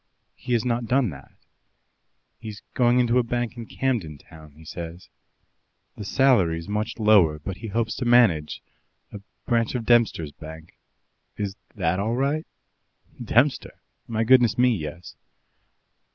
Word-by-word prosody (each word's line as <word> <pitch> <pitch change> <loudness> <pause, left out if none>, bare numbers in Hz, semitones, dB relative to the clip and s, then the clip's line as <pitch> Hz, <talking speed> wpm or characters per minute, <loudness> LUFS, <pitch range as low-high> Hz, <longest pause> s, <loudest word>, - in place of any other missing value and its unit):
"He 125 0 -5
has 115 -1 +1
not 120 -1 -1
done 125 -3 +2
that. 70 -3 -13 1.1
He's 110 -2 -9
going 125 0 +3
into 120 0 +3
a - - +2
bank 120 0 -3
in 115 -2 -8
Camden 110 - -2
Town, 80 0 -16
he 80 +2 -17
says. 85 +2 -8 0.9
The 105 - -7
salary's 95 -9 +2
much 105 +1 -3
lower, 105 -9 +4
but 90 +5 -7
he 115 - -7
hopes 110 +1 -1
to 125 - -3
manage 115 -11 +3 0.5
a 105 - -7 0.3
branch 115 0 0
of 120 -2 -3
Dempster's 115 -10 +2
Bank. 80 +2 -12 0.6
Is 100 -2 -3 0.2
that 90 -2 0
all 110 +4 -1
right?" 140 +5 -1 0.8
"Dempster! 120 +5 +1 0.3
My 115 -1 -1
goodness 120 -2 +4
me, 125 -1 +3
yes." 80 0 -7
110 Hz, 140 wpm, -24 LUFS, 85-120 Hz, 1.1 s, lower